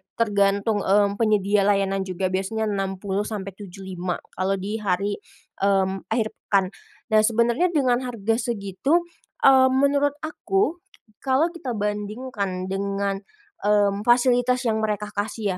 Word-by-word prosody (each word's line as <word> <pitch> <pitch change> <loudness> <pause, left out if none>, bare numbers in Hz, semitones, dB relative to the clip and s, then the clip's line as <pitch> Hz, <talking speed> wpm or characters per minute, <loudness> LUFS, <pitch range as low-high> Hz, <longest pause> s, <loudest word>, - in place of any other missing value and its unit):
tergantung, 205 -1 +1
mmm, 200 +1 +2
penyedia 205 -2 +2
layanan 195 -1 +2
juga, 185 0 -2
biasanya 195 +4 -1
60 195 +1 -2
sampai 200 -3 -5
75 185 -2 -5 0.2
kalau 195 +1 +1
di 205 +4 -4
hari, 200 0 -1 0.4
mmm, 195 -1 +1
akhir 220 -1 0
pekan. 195 -3 0 0.4
Nah, 215 - +6
sebenarnya 235 +8 +2
dengan 255 -4 +3
harga 230 -4 -1
segitu, 235 - 0 0.4
mmm, 265 -1 +7
menurut 280 +1 +2
aku 355 +3 -1 0.4
kalau 275 +5 +2
kita 305 -8 -5
bandingkan 210 -2 -3
dengan, 195 0 -1 0.5
mmm, 205 0 +2
fasilitas 245 +1 +3
yang 220 -2 +1
mereka 210 -1 -2
kasih 205 -2 -2
205 Hz, 125 wpm, -24 LUFS, 195-240 Hz, 0.5 s, mmm